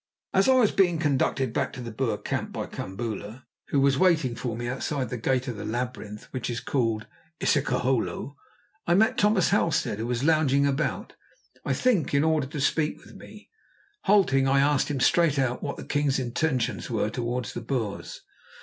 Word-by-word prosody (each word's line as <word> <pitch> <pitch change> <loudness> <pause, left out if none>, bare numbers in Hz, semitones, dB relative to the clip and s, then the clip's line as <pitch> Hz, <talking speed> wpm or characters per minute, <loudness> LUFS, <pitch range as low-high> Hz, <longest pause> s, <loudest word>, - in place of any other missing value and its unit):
As 195 +7 +4
I 260 - +6
was 240 -5 +4
being 180 -4 +3
conducted 135 -5 0
back - - -1
to 135 - -8
the 120 -2 -6
Boer 115 -2 -1
camp - - -3
by - - -4
Kambula, 110 +3 -6 0.2
who 140 - +1
was 135 0 +3
waiting 165 -9 +3
for 120 -1 -4
me 120 0 -4
outside 130 0 -3
the - - -2
gate 130 +3 0
of 120 -4 -4
the 105 - -6
labyrinth 115 -3 -4
which 130 -2 -4
is 120 0 -2
called 115 -5 -1 0.3
isiklohlo, 135 -1 0 0.5
I 170 - +4
met 220 +6 +3
Thomas 210 -4 +3
Halstead, 165 - +1
who 115 - -2
was 120 +1 -1
lounging 145 -3 +3
about, 140 +3 -1 0.5
I - - 0
think 205 - +1
in 140 - +4
order 155 -4 +1
to 145 +2 -6
speak 150 +2 +1
with - - -15
me. - - -14 0.5
Halting, 150 -10 +4
I 135 +1 +3
asked 145 0 +2
him 140 -2 -2
straight 165 -2 +3
out 130 -2 0
what 140 - -4
the - - -8
king's 145 -2 +1
intentions 130 0 -1
were 110 -2 -1
towards 120 -1 -3
the - - -5
Boers. 115 -4 -4
135 Hz, 185 wpm, -26 LUFS, 120-155 Hz, 0.5 s, I